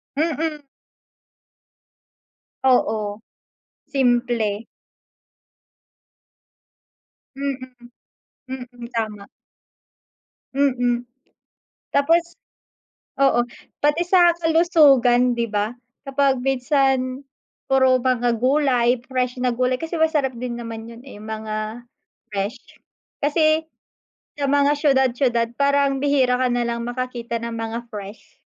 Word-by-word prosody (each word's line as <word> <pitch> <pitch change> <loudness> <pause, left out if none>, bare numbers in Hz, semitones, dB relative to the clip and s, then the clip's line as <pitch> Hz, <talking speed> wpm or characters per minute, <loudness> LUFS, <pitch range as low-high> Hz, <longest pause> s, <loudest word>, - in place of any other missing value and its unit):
Mm. 310 -1 -2 2.0
Oo, 220 -4 +1 0.7
simple. 240 -5 +1 2.7
Mm, 275 -1 -2 0.9
mm, 245 -2 -8
tama. 215 -3 -4 1.3
Mm, 245 -3 +1 0.9
tapos 330 +5 +3 1.0
oo, 275 -3 +4 0.4
pati 295 +3 +3
sa 350 -1 +6
kalusugan 290 -8 +4
'di 235 0 -1
ba, 210 +3 -1 0.3
kapag 275 -1 +2
minsan 270 0 +1 0.4
puro 260 -1 +4
mga 245 -2 +1
gulay, 255 -2 +2
fresh 250 -1 -2
na 250 - +2
gulay, 250 +1 0
kasi 325 +1 -4
masarap 305 -5 +1
din 245 -1 -4
naman 225 -1 -7
'yun 230 +1 -11
eh, 260 -5 -12
mga 215 +2 -5 0.4
fresh. 200 +2 -3 0.6
Kasi, 310 +2 +2 0.7
sa 280 -1 -1
mga 285 0 +4
siyudad-siyudad 260 -5 +2
parang 280 0 +2
bihira 270 -3 +3
ka 255 - +2
na 240 0 0
lang 235 0 -2
makakita 240 -1 -4
ng 235 0 -5
mga 225 0 -3
fresh. 210 -1 -10
255 Hz, 90 wpm, -22 LUFS, 235-280 Hz, 2.7 s, sa